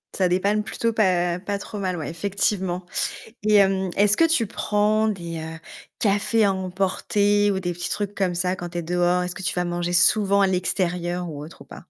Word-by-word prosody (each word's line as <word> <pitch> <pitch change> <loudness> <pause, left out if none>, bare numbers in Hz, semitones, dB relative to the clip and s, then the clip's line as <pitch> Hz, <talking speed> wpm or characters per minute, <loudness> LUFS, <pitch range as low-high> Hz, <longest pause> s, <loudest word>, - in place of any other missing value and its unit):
Ça 185 - +2
dépanne 200 +4 +1
plutôt 230 +1 -2
pas 180 -4 +1
pas 200 +1 -3
trop 205 +1 -7
mal, 185 -2 -2
ouais 155 - -5
effectivement 185 0 -2 0.6
et 215 0 +3
hem, 190 -2 +3
est-ce 205 +1 +4
que 330 - +5
tu 320 -8 +2
prends 215 +1 +1
des, 170 -5 -4
heu, 160 +1 -7 0.4
cafés 210 +2 +2
à 200 - +3
emporter, 195 +2 0
ou 190 - -2
des 175 -1 -2
petits 175 +1 -3
trucs 205 -1 -2
comme 185 -3 -1
ça 180 +1 0
quand 175 - -5
tu 175 0 -4
es - - -3
dehors? 175 +1 +1
Est-ce 180 0 -4
que - - -7
tu - - -1
vas 180 - 0
manger 175 0 -2
souvent 200 +3 +4
à 195 - +4
l'extérieur, 180 -1 -1
ou 145 -2 -7
autre, 165 - -14
ou - - -12
pas? - - -12
190 Hz, 210 wpm, -23 LUFS, 175-205 Hz, 0.6 s, que